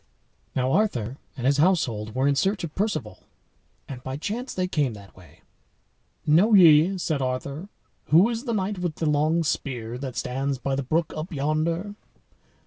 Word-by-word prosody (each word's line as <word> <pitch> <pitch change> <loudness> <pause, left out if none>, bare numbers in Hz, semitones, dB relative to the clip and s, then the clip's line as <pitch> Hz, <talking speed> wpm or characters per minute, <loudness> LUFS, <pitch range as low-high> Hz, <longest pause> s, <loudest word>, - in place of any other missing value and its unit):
Now 130 0 +1
Arthur 135 - 0 0.2
and 125 - -4
his 140 +1 +3
household 120 - +1
were 130 +2 +2
in 145 - +3
search 190 +7 0
of 160 -3 -5
Perceval, 155 - -2 0.7
and 130 -3 -8
by 130 +1 -5
chance 230 - -4
they 185 -1 -1
came 145 -9 0
that 100 -2 -14
way. 85 -4 -18 0.8
"Know 185 +9 +5
ye," 170 +1 +6
said 155 -5 -1
Arthur, 140 +7 -3 0.4
"who 170 +7 +5
is 235 +2 -4
the 235 - -1
knight 195 -1 -2
with 175 -3 -2
the 160 - -3
long 155 +3 +2
spear 125 -5 -3
that 130 -2 -6
stands 135 +2 -2
by 135 +1 -2
the 140 - -1
brook 160 +5 -1
up 155 +4 -5
yonder?" 160 +6 -1
150 Hz, 170 wpm, -25 LUFS, 130-180 Hz, 0.8 s, ye